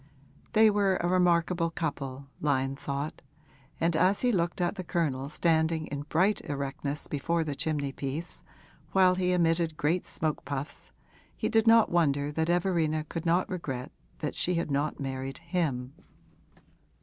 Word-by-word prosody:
They 220 0 +6
were 200 -2 +2
a 175 - -1
remarkable 175 -1 +2
couple, 140 -5 -4
Lyon 135 -2 +1
thought, 140 +2 -4 0.6
and 165 0 +2
as 185 +5 +3
he 250 - +3
looked 175 -4 0
at 175 -1 +1
the 190 -3 -6
Colonel 145 -6 -1
standing 160 0 +1
in 145 0 -6
bright 190 +6 +2
erectness 140 +1 -3
before 165 +3 0
the 150 -2 -3
chimney 145 -1 -1
piece 140 +5 -4 0.5
while 185 -1 +6
he 180 0 +1
emitted 165 -2 +2
great 165 +5 0
smoke 155 -1 -1
puffs 140 +2 -4 0.5
he - - -1
did 225 0 +3
not 225 -1 +6
wonder 145 -4 +2
that 160 +2 -1
Everina 170 -3 +1
could 165 0 -4
not 175 +2 +3
regret 135 -9 -4 0.4
she 180 - 0
had 170 -3 -1
not 145 +2 0
married 135 0 -4
him. 150 -7 -2
160 Hz, 150 wpm, -29 LUFS, 140-175 Hz, 0.6 s, They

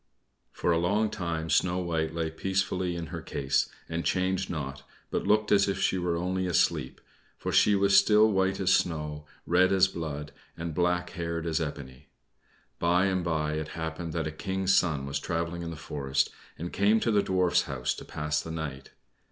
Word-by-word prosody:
For 85 - 0
a 85 - +3
long 105 +5 +1
time 85 -5 -3
Snow 90 0 +2
White 80 -3 -1
lay 80 -1 -1
peacefully 95 0 -1
in 85 -1 -4
her - - -4
case, 65 -1 0 0.2
and 85 +1 -3
changed 95 +1 0
not, 70 -5 -4 0.3
but - - -1
looked 105 0 +3
as 100 -1 +5
if 100 -1 -1
she 95 -1 +1
were 85 -1 0
only 90 +2 -1
asleep, 90 - +1 0.4
for - - -3
she 105 - +5
was 100 0 +3
still 105 +1 +6
white 95 -1 +1
as 95 -1 +3
snow, 75 -4 -1 0.2
red 90 +2 +4
as 95 -1 +5
blood, 75 -5 -5 0.3
and 85 0 -4
black 90 +1 0
haired 85 0 -3
as 80 -1 0
ebony. 70 -4 -6 0.7
By 90 +2 +3
and 95 -2 0
by 80 -2 0
it 75 0 -3
happened 80 +1 -4
that 80 -2 -1
a 80 - -2
King's 95 +3 -1
son 75 -6 +2
was 70 0 -2
traveling 85 +1 -3
in 85 - -4
the 85 - -6
forest, 70 -2 -1 0.3
and 85 +2 -6
came 105 +3 +3
to 115 - +1
the 105 -1 +4
Dwarfs' 90 -2 +2
house 65 -2 -1
to - - -9
pass 75 0 -2
the - - -8
night. 80 -5 -5
85 Hz, 190 wpm, -28 LUFS, 80-95 Hz, 0.7 s, still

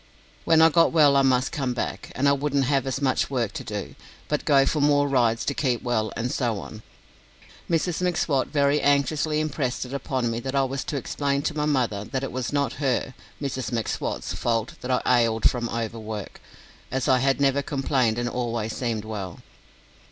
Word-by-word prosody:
When 160 -1 +5
I 165 - +8
got 165 +1 +4
well 150 -4 +5
I 140 - +5
must 130 -1 +2
come 135 -6 -2
back, 100 -4 -4
and 140 +2 +2
I - - +6
wouldn't 140 -1 +1
have 135 0 +1
as 135 +2 -2
much 130 - +1
work 120 -6 -1
to - - -5
do, - - -5 0.4
but 150 - -1
go 140 -2 +5
for 150 - 0
more 145 0 +4
rides 120 -4 +2
to 140 - 0
keep 125 -4 -1
well, 110 -4 0
and 120 +2 -2
so 115 -6 -1
on. 110 +2 -9 0.9
Mrs 170 +1 0
M'Swat 160 -6 +1
very 145 0 +2
anxiously 145 +2 +2
impressed 140 -5 -2
it 125 - -9
upon 130 -3 -1
me 115 - -2
that 130 +3 -4
I 135 - +3
was 135 0 -2
to 145 - -3
explain 140 +2 -1
to 160 - -1
my 150 -1 0
mother 125 -9 0
that 130 +5 -4
it 135 - -3
was 125 -1 -3
not 140 -4 0
her 130 -1 0 0.3
(Mrs 130 -4 -3
M'Swat's) 115 -2 -2
fault 115 -1 -1
that 125 - -6
I 125 - +1 0.2
"ailed" 115 -1 +3
from 120 -2 -2
overwork, 110 -3 -5 0.5
as 130 0 -1
I 130 - +4
had 135 +1 +2
never 140 0 +3
complained 135 -5 0
and 120 0 -1
always 120 -3 -2
seemed 115 -4 -2
well. 100 -5 -6
130 Hz, 195 wpm, -25 LUFS, 120-140 Hz, 0.9 s, I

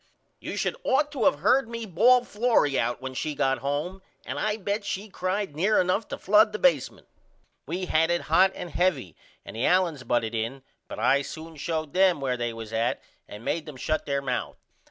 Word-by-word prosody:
You - - -6
should - - -1
ought 295 - +2
to 270 -6 +1
of 145 - +1
heard 245 +5 +3
me 230 -1 -5
ball 235 +7 +4
Florrie 210 - +1
out 120 +1 -2
when 130 0 -5
she 150 +4 -3
got 135 -2 +1
home 150 +8 -3 0.2
and - - -4
I 215 0 0
bet 205 +1 -2
she 200 +1 -4
cried 190 +2 -2
pretty 145 - -16
near 215 +3 +4
enough 185 +4 +1
to - - -5
flood 210 +2 +4
the - - -2
basemunt. 170 -9 +1 0.6
We 180 +5 -3
had 165 -1 +2
it 175 0 +1
hot 190 +1 +4
and 175 - -7
heavy 150 - 0 0.3
and - - -9
the 115 - 0
Allens 175 -6 +2
butted 120 -2 0
in 115 +4 -3 0.2
but - - -8
I 130 +5 +3
soon 160 +3 -8
showed 155 0 -3
them 185 -4 +4
where 130 -2 -1
they 120 -1 -2
was 115 -1 -8
at 115 +2 0 0.3
and 105 +3 -10
made 165 -1 -2
them 150 -4 -9
shut 155 +4 -2
there 140 -1 -1
mouth. 125 -2 -3
165 Hz, 210 wpm, -26 LUFS, 135-200 Hz, 0.6 s, ball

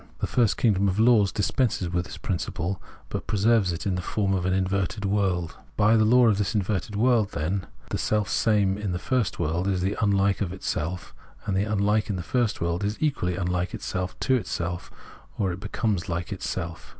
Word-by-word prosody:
The - - -2
first 115 -5 +2
kingdom 100 -4 +3
of 95 0 0
laws 110 -4 +5
dispenses 105 -2 0
with 90 0 -1
this - - -8
principle, 90 -2 -3 0.3
but - - -4
preserves 105 -2 +3
it 85 - -5
in 95 - +1
the 90 - -2
form 100 +2 0
of 90 -1 0
an 95 - +1
inverted 95 +2 0
world. 95 -4 0 0.2
By 110 +1 +5
the 110 -1 +4
law 120 +2 +6
of 105 -2 +3
this 105 +2 -1
inverted 100 0 -1
world, 115 -2 +2
then, 90 +6 -2 0.2
the - - -1
self 105 -2 +1
same 100 -3 +2
in 100 -3 -2
the - - -1
first 115 +2 0
world 85 +3 -1
is 95 -2 0
the 95 +3 0
unhke 100 -1 +2
of 95 -3 -1
itself, 90 -1 -3 0.3
and 100 -2 -1
the 100 +2 +2
unhke 105 0 +1
in 100 - 0
the 90 - -4
first 120 +2 0
is 90 +5 -1
equally 135 - 0
unlike. 90 -1 -1
to 95 +7 -1
itself, 90 -6 -3 0.5
or 95 -3 +1
it 90 - -5
becomes 105 -2 -2
like 85 +2 -2
itself. 85 -3 -5
100 Hz, 195 wpm, -26 LUFS, 90-105 Hz, 0.5 s, law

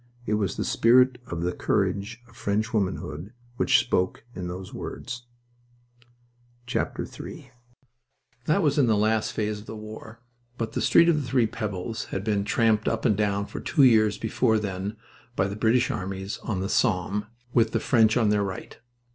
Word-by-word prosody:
It 110 - -1
was 105 -3 0
the - - -1
spirit 125 +2 +4
of 85 0 -4
the 90 - 0
courage 105 +6 -1
of 115 - -20
French 110 +1 -1
womanhood 95 -2 -2 0.2
which - - +4
spoke 90 +4 0
in 90 -4 -5
those 90 +1 -7
words. 120 0 -7 1.5
III - - -4 0.9
That 155 - +2
was 145 -1 +2
in 130 - +4
the 110 -2 +3
last 110 0 +1
phase 105 -2 -2
of 105 - -14
the 110 - -6
war, 110 +1 -10 0.4
but 115 -2 -3
the - - -2
Street 170 - +5
of 170 -2 +4
the 135 - -6
Three 125 -1 +3
Pebbles 110 0 -4
had 95 - -4
been 105 -2 0
tramped 110 +1 +2
up 115 -1 -1
and 105 - +4
down 100 -1 0
for - - -7
two 145 - +2
years 110 -4 +5
before 110 0 +1
then 100 0 -4 0.4
by 95 - +1
the 100 - -5
British 120 +4 +2
armies 95 +2 -4
on 95 -5 -2
the 95 - -1
Somme, 105 -2 +1 0.3
with 115 -2 +3
the 115 - +1
French 110 -2 +3
on 110 -4 +3
their 105 -1 +2
right. 95 -2 -6
110 Hz, 175 wpm, -26 LUFS, 100-115 Hz, 1.5 s, Street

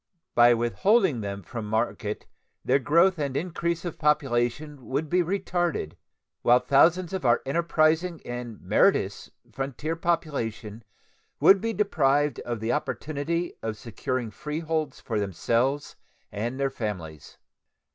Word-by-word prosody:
By 120 0 +6
withholding 130 - +2
them 100 -1 -5
from 115 -4 -6
market 110 -1 -2 0.4
their 135 +2 +3
growth 170 +6 +3
and 140 -2 -1
increase 170 +1 -2
of 175 - -5
population 145 -1 0
would 145 +4 -2
be 180 0 +4
retarded, 175 - -1 0.5
while 120 +1 +6
thousands 165 +8 +3
of 190 - -3
our 120 -2 +3
enterprising 165 +2 +1
and 120 -2 -6
meritorious - - +2 0.2
frontier 140 +4 -3
population 135 -11 -2 0.6
would 195 -1 +6
be 225 0 -1
deprived 145 - +1
of 120 -2 -4
the 110 +1 0
opportunity 155 +3 -2
of 110 -1 -4
securing 115 +2 -4
freeholds 155 - -3
for 110 -3 -2
themselves 115 - 0 0.4
and 115 +6 -3
their 135 -1 0
families. 90 - -6
140 Hz, 125 wpm, -26 LUFS, 120-165 Hz, 0.6 s, By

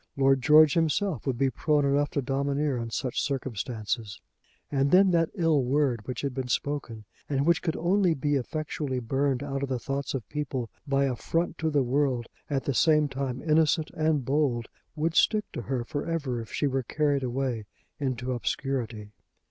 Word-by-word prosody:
Lord 135 -1 +4
George 150 +3 +7
himself 165 - 0
would 130 -3 0
be 135 +1 +2
prone 150 0 +1
enough 140 +1 +2
to 140 - -2
domineer 140 +1 0
in 115 -1 -3
such 125 +2 -2
circumstances. 115 -5 -3 0.5
And 140 -1 +2
then 185 +3 +6
that 165 -2 +2
ill 165 -7 +2
word 130 -4 0
which 125 -2 -4
had 140 -2 -2
been 130 -1 -3
spoken, 125 -4 -2 0.2
and 140 -1 +1
which 170 0 +3
could 160 - -1
only 180 0 +2
be 145 +2 -1
effectually 145 0 -2
burned 135 +2 0
out 135 -1 -3
of 140 - -2
the 130 - 0
thoughts 135 +3 -3
of 120 -7 -5
people 135 -5 -3 0.2
by 140 0 +2
a 130 -2 0
front 165 +8 -2
to 160 - +1
the 145 -3 +2
world 130 -1 +1 0.2
at 140 -2 0
the 140 - -1
same 150 +1 +4
time 135 -2 -4
innocent 155 0 +2
and 155 -4 0
bold, 135 -4 0 0.3
would 155 +2 0
stick 210 +4 +3
to - - -4
her 125 +1 -2
for 145 +4 -4
ever 145 -8 -2
if 115 - -10
she - - -1
were 135 -1 +1
carried 145 +2 0
away 125 -4 -2 0.3
into 130 -2 -2
obscurity. 120 -4 -3
140 Hz, 185 wpm, -27 LUFS, 125-150 Hz, 0.5 s, George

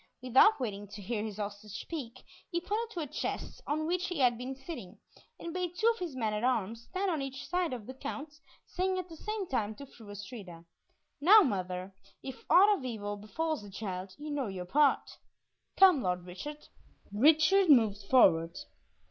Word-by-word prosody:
Without 265 - +5
waiting 205 -5 -4
to 200 +1 -10
hear 210 +2 -3
his 215 -2 -6
hostage 210 +1 -6
speak, 255 -7 -7 0.3
he 345 - -1
pointed 425 +6 -2
to 340 - -2
a - - -2
chest 275 - -5
on 310 +2 -1
which 360 +3 0
he 355 - -4
had 250 -3 +4
been 250 +3 -5
sitting, 265 - -9 0.4
and 335 - -6
bade 355 -1 -3
two 440 - -1
of 460 - -14
his 340 -7 -5
men 220 -4 -1
at 210 +2 -2
arms 230 -2 0
stand 380 0 -1
on 315 -4 -1
each 270 0 -6
side 355 0 0
of 240 -5 -5
the 260 - -7
Count, 285 +3 -6 0.3
saying 375 0 -1
at 365 -1 -4
the 325 - -9
same 425 +2 -4
time 220 -6 -1
to 280 - -9
Fru 225 -5 -15
Astrida, 200 -5 -9 0.6
"Now, 410 +8 +9
mother, 185 - -3 0.3
if 265 -1 -8
aught 405 +3 +7
of - - -10
evil 210 -5 -4
befalls 310 +9 -3
the 205 - -11
child, 190 -2 -6
you 300 0 -6
know 280 -4 -1
your 185 -2 -5
part. 280 +8 +2 0.6
Come, 370 -7 +7
Lord 180 -2 -1
Richard." 290 +12 -8 0.4
Richard 310 - +5
moved 220 -7 +5
forward. 170 -9 +5
255 Hz, 190 wpm, -31 LUFS, 205-325 Hz, 0.6 s, Now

